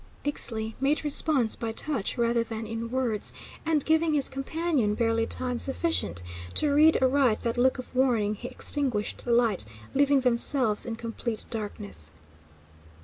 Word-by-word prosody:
Ixtli 225 -6 -1
made 280 +4 +1
response 285 -5 +3
by 230 -1 -3
touch 245 -2 -2
rather 235 0 +2
than 225 -1 -5
in 225 +1 -4
words, 245 -4 -1 0.3
and, 310 -3 +2
giving 320 0 +3
his 280 -2 +2
companion 270 -4 -1
barely 225 0 +1
time 250 -1 -2
sufficient 270 - 0 0.3
to 295 -2 +2
read 310 +2 +6
aright 260 -4 +3
that 230 -1 -1
look 255 +2 +3
of 255 - -9
warning, 235 -5 +2
he 230 +4 -7
extinguished 250 -9 -1
the 240 - -1
light, 235 -5 +3 0.3
leaving 280 0 +3
themselves 245 -2 +2
in 230 - -3
complete 230 0 -5
darkness. 100 - -4
245 Hz, 145 wpm, -27 LUFS, 225-280 Hz, 0.3 s, read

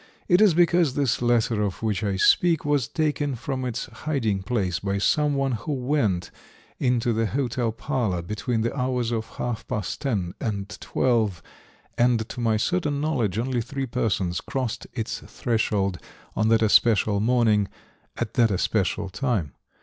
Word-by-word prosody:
It 180 +3 +5
is 200 -7 +6
because 170 -4 +3
this 140 -5 +1
letter 120 -2 +2
of 100 +1 -2
which 110 -1 0
I 100 -2 0
speak 165 - +3
was 145 -5 +1
taken 145 -3 -1
from 130 +3 -4
its 125 -1 -3
hiding 110 -4 -2
place 95 -5 -1
by 100 0 -1
some 145 +8 +2
one 135 -1 0
who 120 +6 -3
went 125 -9 0 0.5
into 120 -2 +1
the 115 0 +1
hotel 125 -1 -1
parlor 110 - -2
between 110 +5 -2
the 115 +3 -1
hours 125 -3 -1
of 110 -1 -2
half 120 -3 -4
past 105 -4 -3
ten 100 -11 -1
and 100 -3 -2
twelve, 110 - 0 0.6
and 120 -2 +3
to - - -7
my 115 -2 +2
certain 150 +3 0
knowledge 125 - 0
only 120 +1 0
three 135 +3 -4
persons 95 -7 -1
crossed 130 -4 -3
its 115 -2 -3
threshold 105 -5 -1 0.4
on 110 - +1
that 115 0 +4
especial 105 -1 +4
morning 110 -3 +3 0.5
at - - -3
that 115 -2 +4
especial 100 +1 0
time. 95 - -2
115 Hz, 155 wpm, -25 LUFS, 105-135 Hz, 0.6 s, is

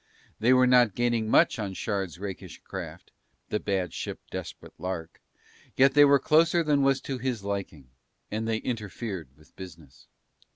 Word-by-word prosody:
They 120 +3 +3
were 130 0 +6
not 125 -5 +4
gaining 120 -2 0
much - - +4
on 100 -3 -4
Shard's 95 -4 -3
rakish 95 0 -7
craft, - - -8 0.4
the 105 - -1
bad 95 -4 -2
ship - - -5
Desperate - - -8
Lark, 90 -3 -5 0.6
yet 135 +1 +5
they 145 +1 +7
were 140 0 +6
closer 165 +5 +3
than 145 -2 +2
was 135 -1 +2
to 135 -2 -5
his 120 -4 -3
liking, 100 -9 -5 0.4
and 110 +1 -2
they 110 -1 0
interfered 105 - -5
with 75 - -23
business. 80 -7 -12
110 Hz, 160 wpm, -27 LUFS, 95-130 Hz, 0.6 s, they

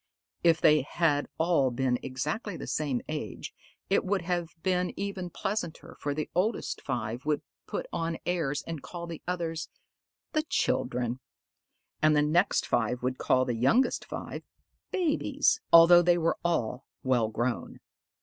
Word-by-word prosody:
If 165 -1 +5
they 155 -2 +5
had 145 +1 +1
all 160 -5 +3
been 125 0 0
exactly 150 - -3
the - - -6
same 140 -5 -1
age, 150 -9 -5 0.3
it 195 - +2
would 190 -1 0
have 175 -1 -1 0.2
been 180 -1 +1
even 195 -3 -3
pleasanter, 195 -3 -4
for 145 -1 -2
the 155 - -2
oldest 210 +6 -1
five 120 -1 -3
would 150 -1 0 0.2
put - - -3
on 165 0 -1
airs 155 -5 -1
and 165 -3 -6
call 170 -1 -7
the 170 -2 -7
others 170 -2 -2 0.6
"the 310 - +3
children"; 125 - -1 0.8
and 155 0 +5
the 150 - +4
next 170 +6 +2
five 125 0 0
would 130 0 -1
call 130 0 +3
the 125 - -1
youngest 135 - +2
five - - -6 0.5
"babies"; 345 -6 +1
although 170 +1 +9
they 175 0 +4
were 165 -1 0
all 130 -7 -1 0.2
well 125 -4 +2
grown. 120 +2 -2
160 Hz, 150 wpm, -29 LUFS, 130-175 Hz, 0.8 s, although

